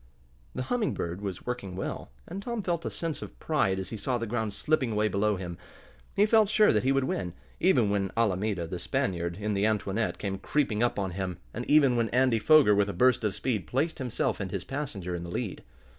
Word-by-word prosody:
The 130 - -2
Humming 230 - 0
Bird 85 +3 -4
was 95 -3 -5
working 125 -7 -4
well, 95 - -4 0.2
and 190 +4 -5
Tom 235 0 -3
felt 170 -2 -1
a - - 0
sense 165 -3 -4
of - - -9
pride 100 -12 +1
as 95 -1 -4
he 110 - -4
saw 125 +5 -1
the 115 - -3
ground 110 -1 -2
slipping 130 +4 0
away 105 0 +2
below 105 +1 +1
him. 90 -2 -6 0.6
He 205 - +5
felt 215 -1 +4
sure 215 0 +5
that 105 - +3
he 130 - +3
would 135 0 +2
win, 90 -9 -2 0.3
even 125 - +3
when 100 -1 0
Alameda, 105 -4 +1
the 85 +2 -5
Spaniard, 90 -11 -1
in 105 0 -1
the 100 +2 +2
Antoinette, 105 0 -1
came 95 -1 -3
creeping 115 -2 0
up 120 - +1
on 95 -2 -1
him, 90 -1 -3 0.2
and 120 - -4
even 140 -5 +5
when 115 -1 +1
Andy 125 -2 +3
Foger, 150 -4 +6
with 100 0 +2
a - - -3
burst 125 +6 +3
of 105 -3 0
speed, 105 -2 -2
placed 150 +6 -1
himself 125 -3 -1
and 100 -2 -3
his 95 -3 -4
passenger 120 -10 -4
in 85 -1 -4
the 85 - -7
lead. 100 +2 -4
110 Hz, 225 wpm, -28 LUFS, 95-135 Hz, 0.6 s, Foger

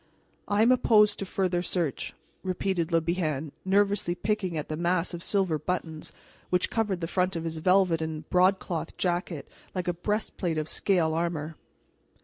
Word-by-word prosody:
"I 205 +1 +3
am 235 - +5
opposed 210 -4 +4
to 195 - -3
further 180 -2 0
search," 170 -6 -2 0.3
repeated 185 -2 -1
Le 165 0 +4
Bihan, 155 -4 -1
nervously 195 -2 +2
picking 190 -2 -1
at 150 - -3
the 155 - -3
mass 175 +2 0
of 170 - -5
silver 185 -5 +1
buttons 160 -1 -4 0.4
which 180 0 +1
covered 210 -5 0
the 165 - -1
front 180 +1 0
of 165 - -3
his 165 -1 -4
velvet 180 -1 +3
and 160 -1 -4
broadcloth 180 -2 +1
jacket 175 -3 -1 0.3
like 180 0 -2
a 175 - +2
breastplate 180 -2 -2
of 155 0 -1
scale 170 -3 +1
armor. 165 -2 -2
175 Hz, 160 wpm, -28 LUFS, 165-190 Hz, 0.4 s, am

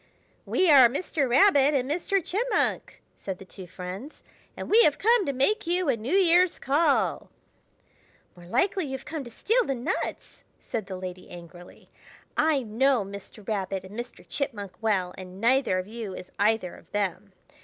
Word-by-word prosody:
"We 370 - +2
are 260 -4 +8
Mr. 280 0 -2
Rabbit 285 -1 +5
and 260 -2 0
Mr. 355 +4 -1
Chipmunk," 440 +7 -1
said 190 -2 -6
the 195 - -12
two 185 0 -11
friends, 185 - -8 0.3
"and - - -6
we 450 +3 +6
have 295 -9 +4
come 455 -3 +3
to - - +1
make 280 - +1
you 355 -2 +1
a 260 - +3
New 235 - -2
Year's 360 -1 +4
call." 290 +6 +1 1.1
"More 175 -1 -14
likely 365 - +1
you 270 - -6
have 265 0 -6
come 305 -2 -5
to - - -9
steal 455 - +1
the 275 - -2
nuts!" 270 +10 -4 0.2
said 220 -4 -5
the 190 -2 -6
lady 185 0 -8
angrily. 175 0 -13 0.4
"I 300 -4 +2
know 235 +1 +1
Mr. 200 +1 -11
Rabbit 195 -3 -2
and 190 +2 -11
Mr. 240 +2 -8
Chipmunk 210 -9 -3
well, 190 -5 0
and 185 0 -10
neither 245 -3 +2
of 185 - -3
you 215 -2 -7
is 180 - -10
either 210 -3 +1
of - - -19
them. 200 -1 -2
240 Hz, 175 wpm, -26 LUFS, 195-310 Hz, 1.1 s, are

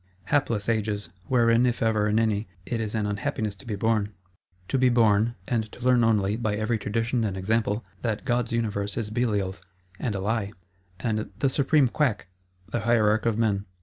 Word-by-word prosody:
Hapless 115 -8 +1
ages: 105 -5 -1 0.2
wherein, 120 -1 +4
if 120 -1 -1
ever 110 -2 +2
in 105 +1 +1
any, 110 -1 +1 0.2
it 115 -2 -2
is 110 0 -3
an 110 -2 0
unhappiness 105 +1 -2
to 100 - -13
be 110 - -2
born. 105 0 +1 0.6
To 135 - +1
be 130 0 +5
born, 115 -1 +3
and 110 -3 -1
to - - -11
learn 125 -2 +5
only, 105 -2 +2
by 110 -3 -1
every 110 +2 0
tradition 115 +3 -1
and 100 -3 -2
example, 110 +3 0 0.2
that 110 -1 -2
God's 120 -2 0
Universe 105 -3 -1
is 110 -3 -3
Belial's 105 -5 -1 0.4
and 115 -5 -2
a - - -2
Lie; 105 +1 -1 0.5
and 110 -2 -2
"the 135 - +2
Supreme 140 +1 +3
Quack" 120 -7 0 0.4
the 120 - 0
hierarch 110 -1 +2
of 110 -2 +1
men! 105 -3 0
110 Hz, 180 wpm, -26 LUFS, 105-120 Hz, 0.6 s, be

